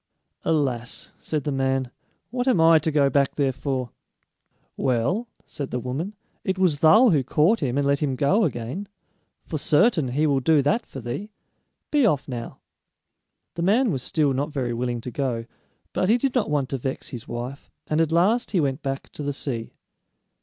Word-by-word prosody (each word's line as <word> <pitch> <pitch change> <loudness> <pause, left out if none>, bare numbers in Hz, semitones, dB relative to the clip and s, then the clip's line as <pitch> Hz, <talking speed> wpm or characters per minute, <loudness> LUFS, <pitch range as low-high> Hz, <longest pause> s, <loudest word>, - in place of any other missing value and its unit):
"Alas," 130 -6 -1
said 150 -3 -3
the 145 - -2
man, 135 -2 0 0.4
"what 245 +1 -2
am 250 -10 +4
I 165 0 +7
to 155 +1 -1
go 145 -2 +4
back 140 0 +1
there 140 -2 +2
for?" 130 -2 -3 0.8
"Well," 130 - 0 0.2
said 140 -2 -5
the 125 - -2
woman, 140 - -4 0.3
"it 190 -1 -1
was 180 -6 +2
thou 215 - +7
who 145 -5 +3
caught 160 - +3
him 135 -4 -1
and 145 - +1
let 140 0 +2
him 140 -3 0
go 185 - +3
again; 135 - -3 0.6
for 155 - -3
certain 160 - +3
he 140 +5 +1
will 140 -3 +2
do 145 +2 +3
that 220 - +1
for 135 - -8
thee. 130 - -5 0.6
Be 295 -2 +3
off 145 -8 0
now!" 120 -3 -6 0.9
The 170 - -4
man 220 +6 +3
was 135 -5 -2
still 145 +1 +1
not 140 +4 -2
very 125 -4 -2
willing 120 0 -2
to 125 - -6
go, 120 -4 -2 0.5
but 185 - +1
he 230 - +5
did 265 +1 0
not 245 -10 +1
want 145 -3 0
to 135 - -2
vex 130 +2 -3
his 120 -3 -7
wife, 125 +4 -6 0.2
and 155 +1 +1
at 160 -1 +1
last 195 +9 +3
he 195 - +1
went 140 -1 0
back 135 -1 -4
to - - -8
the 145 0 -2
sea. 120 -5 -4
145 Hz, 190 wpm, -24 LUFS, 130-170 Hz, 0.9 s, I